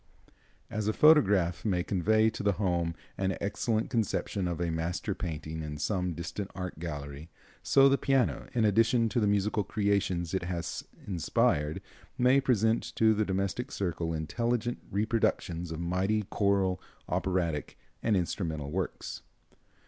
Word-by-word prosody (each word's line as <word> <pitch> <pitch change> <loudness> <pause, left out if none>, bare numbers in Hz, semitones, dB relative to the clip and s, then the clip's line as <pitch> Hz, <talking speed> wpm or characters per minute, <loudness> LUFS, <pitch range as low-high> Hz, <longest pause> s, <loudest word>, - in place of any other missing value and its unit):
As 110 -1 -2
a 110 - +2
photograph 100 - +4
may 90 -5 +1
convey 110 +4 +2
to - - -6
the 100 -1 +2
home 85 -4 0 0.2
an 95 0 0
excellent 110 +2 -1
conception 105 -4 -1
of 85 -1 -3
a 85 -1 0
master 85 +5 -2
painting 80 -3 -5
in 75 -1 -5
some 90 +2 -1
distant 85 +4 -5
art 90 -4 -5
gallery, 75 -1 -6 0.3
so 135 0 +5
the 140 0 +3
piano, 135 -3 +1
in 115 -3 +2
addition 115 +3 +3
to 120 - 0
the 105 - +2
musical 105 +1 +1
creations 100 -5 0
it 95 - +1
has 85 -2 -4 0.2
inspired, 80 -4 0 0.3
may 130 +2 +4
present 115 -3 +2
to 110 -1 +4
the 110 0 +1
domestic 100 +7 -2
circle 85 -3 -2
intelligent 115 +10 -1
reproductions 100 -5 0
of 80 - -4
mighty 95 +5 0
choral, 100 -2 +1 0.3
operatic 85 -6 -1 0.2
and 110 -4 +2
instrumental 80 -5 -2
works. 95 +2 -4
95 Hz, 140 wpm, -30 LUFS, 85-110 Hz, 0.3 s, so